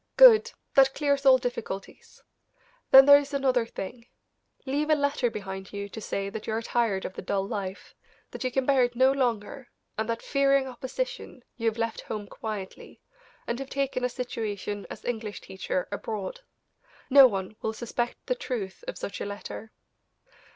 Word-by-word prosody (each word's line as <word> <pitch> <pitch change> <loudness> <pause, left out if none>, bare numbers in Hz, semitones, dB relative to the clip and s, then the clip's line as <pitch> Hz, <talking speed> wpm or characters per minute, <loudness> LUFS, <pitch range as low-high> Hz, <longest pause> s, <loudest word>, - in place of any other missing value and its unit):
"Good; - - +8 0.2
that 270 0 +5
clears 280 -1 +1
all 260 -1 +9
difficulties. 240 -6 -6 0.7
Then 265 0 +10
there 285 0 +9
is 285 0 -5
another 260 -4 +2
thing; 230 +4 -7 0.6
leave 290 +3 -1
a 310 - +6
letter 285 -4 +1
behind 190 -3 -7
you 200 0 -5
to 220 - -8
say 195 -1 -3
that 215 +1 -7
you 220 - -1
are 225 - -1
tired 225 -5 0
of - - -5
the - - -7
dull 195 +1 -1
life; 200 -3 -5 0.4
that - - -6
you 255 - +1
can 265 +1 0
bear 270 -2 +4
it 245 0 -1
no 260 +2 +5
longer, 245 -1 -2 0.3
and 220 +1 -1
that 230 0 -2
fearing 275 -1 +3
opposition, 260 - -5
you 230 -2 -2
have 225 0 0
left 230 -1 -2
home 210 -2 -5
quietly, 205 -2 -7 0.5
and 235 - -3
have 270 0 -6
taken 270 -2 -1
a 250 - +2
situation 210 -5 -4
as - - -9
English 220 -3 -3
teacher 190 -1 -3
abroad. 205 - -5 0.7
No 275 -1 +10
one 195 -2 -4
will 220 - -1
suspect 240 +1 -4
the - - +1
truth 250 - -5
of - - -5
such - - -6
a - - -2
letter." 205 +2 -7
240 Hz, 175 wpm, -27 LUFS, 205-270 Hz, 0.7 s, Then